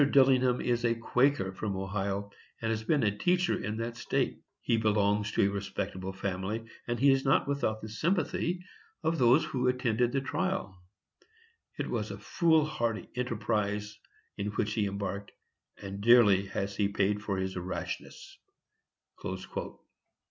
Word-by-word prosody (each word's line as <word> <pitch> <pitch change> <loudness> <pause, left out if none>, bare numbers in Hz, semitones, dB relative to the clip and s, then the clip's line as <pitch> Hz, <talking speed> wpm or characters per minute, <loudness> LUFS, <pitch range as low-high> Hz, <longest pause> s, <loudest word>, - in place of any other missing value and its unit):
Dillingham 130 -3 +4
is 120 -1 0
a 115 -1 +2
Quaker 125 -2 +2
from 100 0 -3
Ohio, 100 +1 -2 0.3
and 115 0 -1
has 110 0 -2
been 145 +4 +2
a 105 -2 +2
teacher 180 - +2
in 105 +2 -3
that 115 +1 -3
state. - - -1 0.2
He - - +1
belongs 105 -1 +2
to - - +3
a 100 - +3
respectable 95 -1 -4
family, 95 +3 -3 0.2
and 120 -1 -1
he 140 +2 +6
is 135 0 +2
not 135 - +3
without 125 -6 -1
the - - -4
sympathy 170 - -1 0.4
of 160 0 +1
those 130 +6 +5
who 125 -4 -1
attended 125 -2 +1
the 135 - +1
trial. 165 - -2 1.0
It - - -2
was - - -1
a - - -6
foolhardy 155 - +1
enterprise 105 -3 -1 0.4
in 100 - -2
which 105 0 -1
he 105 -2 +1
embarked, 100 0 -4 0.5
and 100 0 -6
dearly 105 -4 +6
has 100 +1 -3
he 105 - +3
paid 100 +1 0
for 100 -2 -2
his 95 0 -2
rashness." 90 0 -6
110 Hz, 150 wpm, -30 LUFS, 100-130 Hz, 1.0 s, he